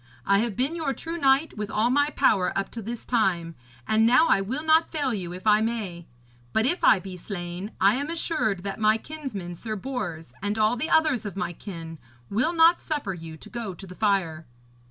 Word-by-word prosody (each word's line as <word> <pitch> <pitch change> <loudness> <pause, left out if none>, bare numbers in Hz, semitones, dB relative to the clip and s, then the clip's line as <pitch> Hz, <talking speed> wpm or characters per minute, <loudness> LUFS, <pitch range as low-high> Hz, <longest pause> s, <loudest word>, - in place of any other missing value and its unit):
I 200 0 +4
have 225 -2 -1
been 270 +7 0
your 310 -5 -2
true 330 +1 -5
knight 275 +2 +3
with 210 -1 -4
all 225 +3 +1
my 285 +2 +3
power 195 -11 +2
up 195 0 -2
to 230 - -6
this 230 +2 -6
time, 180 -8 +1 0.3
and 220 0 +3
now 245 +8 +5
I 195 - +4
will 260 +10 -3
not 320 +1 +4
fail 285 -6 0
you 180 -5 -4
if 180 +3 -9
I 210 0 +5
may; 210 -7 -3 0.5
but 220 - +3
if 350 +8 0
I 205 - +6
be 185 0 -8
slain, 175 +2 -6
I 195 +2 +5
am 285 +3 -3
assured 310 - -1
that 200 +1 -4
my 215 0 +4
kinsman 225 - -6
Sir 215 +5 -5
Bors 190 - -5
and 205 +1 -2
all 215 +2 +3
the 255 +7 -3
others 310 -7 +3
of 200 -2 -6
my 185 -4 -2
kin 165 -4 -8 0.3
will 230 +11 +2
not 335 +1 +5
suffer 290 - -3
you 165 -2 -9
to - - -13
go 230 -6 -5
to 195 - -10
the 180 - -10
fire.' 180 -6 0
215 Hz, 215 wpm, -26 LUFS, 190-270 Hz, 0.5 s, I